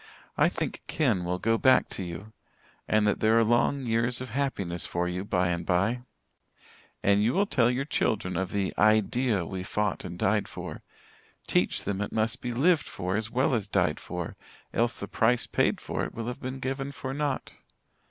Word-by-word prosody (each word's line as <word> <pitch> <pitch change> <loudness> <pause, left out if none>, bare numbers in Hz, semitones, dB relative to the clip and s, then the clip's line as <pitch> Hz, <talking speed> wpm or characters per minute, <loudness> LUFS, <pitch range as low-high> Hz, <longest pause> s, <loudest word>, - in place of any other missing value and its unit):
I - - +4
think - - -4
Ken 110 - +1
will 90 +1 -1
go 115 +4 +1
back 130 -1 +5
to - - -4
you 90 +5 -7 0.5
and 110 0 +3
that 105 - +1
there 110 +1 +4
are 115 - +5
long 120 +4 +2
years 115 +2 +1
of 130 -2 -6
happiness 100 -10 -2
for 85 0 -1
you 90 +1 -3
by 90 -3 +1
and 85 -1 -1
by. 100 +7 +1 1.0
And 100 0 +4
you 115 +5 +2
will 200 - +3
tell 125 - +3
your 125 +2 -1
children 100 -9 0
of 95 +1 -1
the 100 -2 -1
Idea 110 -1 +3
we 95 +2 -5
fought 105 +2 -1
and 90 -1 -6
died 105 +3 +1
for - - -7 0.6
teach - - +1
them 100 0 -2
it 105 - -3
must 110 0 0
be 125 - -3
lived 150 +6 +3
for 90 0 -3
as 110 0 -1
well 130 +3 +1
as 110 -4 0
died 90 -7 +1
for, 90 -2 -5 0.4
else 120 0 +1
the 100 - -5
price 120 +3 +2
paid - - +1
for - - -3
it - - -5
will 115 -1 -4
have 125 +1 -5
been 130 +1 -4
given 135 +1 -3
for 135 -2 -5
nought. 145 -1 -2
110 Hz, 195 wpm, -28 LUFS, 95-125 Hz, 1.0 s, back